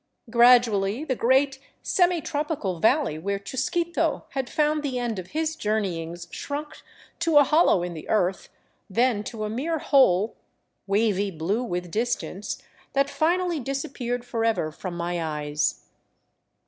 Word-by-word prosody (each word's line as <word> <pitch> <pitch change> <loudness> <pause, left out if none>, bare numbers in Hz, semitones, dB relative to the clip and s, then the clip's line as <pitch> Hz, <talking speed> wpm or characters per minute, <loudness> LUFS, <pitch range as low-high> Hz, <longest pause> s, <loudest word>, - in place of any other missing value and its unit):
Gradually 235 -2 +5
the 265 - 0
great, 265 +3 +2 0.2
semi 355 -2 +2
tropical 290 - -2
valley 225 - +2
where 200 +4 -2
Chusquito 285 - -1
had 265 -2 -3
found 300 0 +1
the 275 -4 -2
end 235 -5 -2
of 180 - -7
his 315 +4 -2
jour 215 -6 0
neyings 170 -3 -4
shrunk 295 +2 -5 0.4
to 330 -3 +3
a 290 - +9
hollow 290 - +4
in 175 -1 -4
the 155 - -9
earth, 190 -3 0 0.4
then 230 +1 +2
to 220 -2 -5
a - - -1
mere 305 +8 -1
hole, 225 - +3 0.5
wavy 200 -1 +1
blue 185 +6 -1
with 180 -6 -4
distance, 215 -2 -3 0.3
that 275 +1 +2
finally 345 +1 +1
disappeared 260 -2 -3
forever 225 -9 0
from 175 +2 -6
my 170 0 -2
eyes. 150 -1 -2
235 Hz, 140 wpm, -25 LUFS, 190-285 Hz, 0.5 s, a